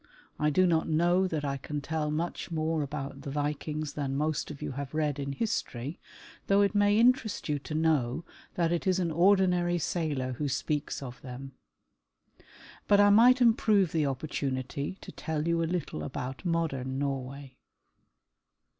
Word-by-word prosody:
I 150 - +3
do 185 +5 +4
not 165 -2 +2
know 175 +4 +3
that 155 -4 -2
I 140 -1 -1
can 145 +2 -4
tell 150 +1 -2
much 160 +3 -3
more 160 -1 0
about 140 -1 -5
the 140 - -6
Vikings 150 +1 -3
than 140 -2 -2
most 155 0 -1
of 150 -2 -8
you - - -4
have 140 +2 -6
read 150 -2 0
in 140 0 -3
history, 145 - -3 0.5
though 200 +1 +4
it 200 +1 +2
may 205 0 +4
interest 235 -3 +2
you 150 -2 0
to 155 +2 -6
know 155 -2 +1 0.3
that 170 -1 +1
it 175 +2 -1
is 185 -1 +3
an 175 -3 0
ordinary 180 0 +3
sailor 150 -6 -1
who 145 - 0
speaks 145 +1 -2
of 125 -2 -8
them. 130 +1 -8 1.4
But 205 - +5
I 205 0 +7
might 245 +4 +6
improve 215 -6 +4
the 155 -3 +1
opportunity 140 +2 -3
to - - -9
tell 160 -1 -3
you 170 0 +2
a - - +1
little 170 - -3
about 130 - -5
modern 135 -6 -1
Norway. 135 -1 -4
155 Hz, 165 wpm, -29 LUFS, 140-175 Hz, 1.4 s, I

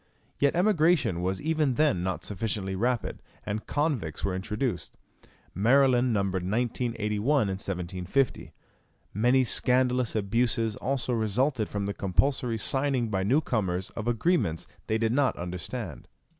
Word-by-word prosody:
Yet 140 +2 +2
emigration 170 - +2
was 95 +1 -1
even 155 -4 +1
then 150 - +2
not 90 -3 -3
sufficiently 100 -1 -3
rapid, 120 +4 -1 0.2
and 105 +1 -4
convicts 145 - -1
were 95 - -1
introduced. 105 - -3 0.6
Maryland 125 +4 +4
numbered 100 -3 0
1981 110 +1 -1 0.2
in - - -2
1750. 95 +5 -2 0.6
Many 125 +6 +3
scandalous 125 -1 +2
abuses 110 +1 0
also 130 -2 -1
resulted 115 +2 0
from 100 -1 -3
the 100 - -2
compulsory 115 +5 0
signing 130 +1 0
by 95 -3 0
new 125 +11 +3
comers 95 - -2
of 115 0 -6
agreements 120 - +1 0.2
they 110 - +1
did 110 0 0
not 135 +1 +2
understand. 90 - -6
115 Hz, 130 wpm, -27 LUFS, 95-130 Hz, 0.6 s, Maryland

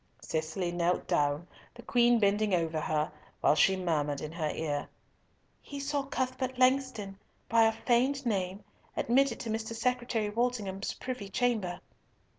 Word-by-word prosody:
Cicely 160 +3 -2
knelt 175 +1 0
down, 145 +3 +1 0.3
the 240 - -11
Queen 240 0 +4
bending 205 -1 +2
over 165 -2 0
her, 155 0 0 0.3
while - - +5
she 190 +5 +4
murmured 150 -6 0
in 155 - -5
her 160 -2 -2
ear, 145 -3 -2 0.7
"He 285 - -8
saw 285 +1 -1
Cuthbert 260 -1 -2
Langston, 255 -7 +1 0.3
by 225 -1 +5
a 225 - +4
feigned 255 +4 +1
name, 195 -3 -1 0.3
admitted 260 0 +2
to 225 - -3
Mr. 220 +1 -3
Secretary 240 -2 0
Walsingham's 210 -4 -1
privy 250 -6 -5
chamber." 200 -6 0
215 Hz, 140 wpm, -30 LUFS, 175-245 Hz, 0.7 s, while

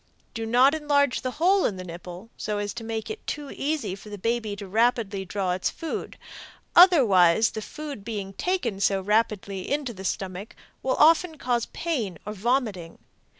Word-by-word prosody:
Do 225 0 -4
not 250 +5 +5
enlarge 285 -4 +1
the 255 - -2
hole 375 +4 +4
in 200 - 0
the 185 - -6
nipple, 180 +4 -9
so 210 -1 -3
as 205 0 -3
to 235 - -7
make 225 - -4
it 435 - -9
too 290 -2 -4
easy 295 -8 -2
for 200 +2 -10
the 205 - -7
baby 225 0 -1
to 205 0 0
draw 190 -1 -1
its 180 +1 0
food, 325 - -5 0.6
otherwise 220 - +6
the 220 - -5
food 290 -2 -7
being 200 -3 -5
taken 265 - -1
so 195 0 +2
rapidly 200 -1 -1
into 285 -4 -1
the 190 -2 -9
stomach 190 +2 -4 0.3
will 260 - 0
often 325 +1 +4
cause 245 -3 -1
pain 240 - -3
or 210 - -4
vomiting. 215 -6 -1
225 Hz, 170 wpm, -25 LUFS, 195-280 Hz, 0.6 s, otherwise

